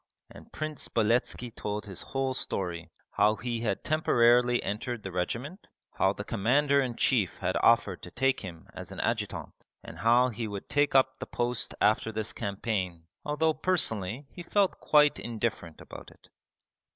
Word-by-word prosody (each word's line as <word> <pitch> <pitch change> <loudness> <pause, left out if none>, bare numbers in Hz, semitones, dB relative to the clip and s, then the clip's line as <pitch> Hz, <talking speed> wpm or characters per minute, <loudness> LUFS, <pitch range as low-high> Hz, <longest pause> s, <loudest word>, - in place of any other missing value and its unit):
and - - -14
Prince 155 -2 -4
Beletski 120 +2 0
told 105 -2 -4
his 95 -3 -7
whole 135 -1 -2
story: 90 -8 -3 0.2
how 105 +1 +3
he 120 +1 -3
had 110 -4 -2
temporarily 120 -5 +3
entered 105 +3 -3
the 95 - -5
regiment, 120 - -4 0.2
how 95 - +2
the 105 - -6
Commander 140 +7 +2
in 125 -3 -2
Chief 110 -8 +1
had - - -1
offered - - +3
to - - -9
take 135 0 +1
him 85 -4 -9
as - - -8
an - - -7
adjutant, - - -2 0.3
and - - -10
how 120 +2 +4
he 115 -1 -4
would 100 -2 -6
take 145 -1 +1
up 130 0 +4
the - - -6
post 120 -1 -2
after 110 +2 +2
this 110 0 -3
campaign 95 -5 -3 0.2
although 155 +2 +1
personally 140 - -1
he 175 - -9
felt 195 +2 +1
quite 150 -1 +4
indifferent 110 -8 -3
about - - -11
it. - - -21
115 Hz, 165 wpm, -29 LUFS, 105-135 Hz, 0.3 s, how